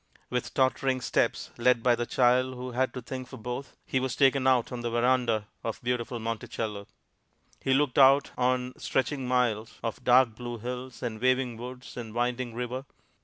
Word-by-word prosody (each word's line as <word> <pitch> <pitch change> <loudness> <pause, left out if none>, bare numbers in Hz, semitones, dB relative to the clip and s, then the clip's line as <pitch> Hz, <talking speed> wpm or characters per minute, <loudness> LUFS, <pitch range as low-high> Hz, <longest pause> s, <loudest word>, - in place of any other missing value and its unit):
With 125 -1 -2
tottering 130 0 +2
steps, 125 - 0
led 120 -1 +3
by 125 - +5
the 120 0 -1
child 130 +1 +3
who 125 0 -6
had 130 +1 +1
to 125 - -5
think 130 +1 -6
for 130 - -10
both, 125 +3 -6
he 130 - 0
was 130 -1 -2
taken 135 -1 +4
out 125 -3 +3
on 125 -1 -4
the 120 - -2
veranda 120 -2 +2 0.2
of 115 - -3
beautiful 120 0 -1
Monticello. 110 -2 -4 0.7
He 130 - +2
looked 140 -2 +2
out 135 +1 +6
on 125 0 0
stretching 135 0 -1
miles 120 -3 0
of 115 +2 -4
dark 125 -1 +5
blue 120 +1 -6
hills 125 +3 -6
and 110 -3 -4
waving 130 -1 +2
woods 125 +2 -9
and 115 -2 -7
winding 120 0 -1
river. 125 +2 -4
125 Hz, 175 wpm, -28 LUFS, 120-130 Hz, 0.7 s, out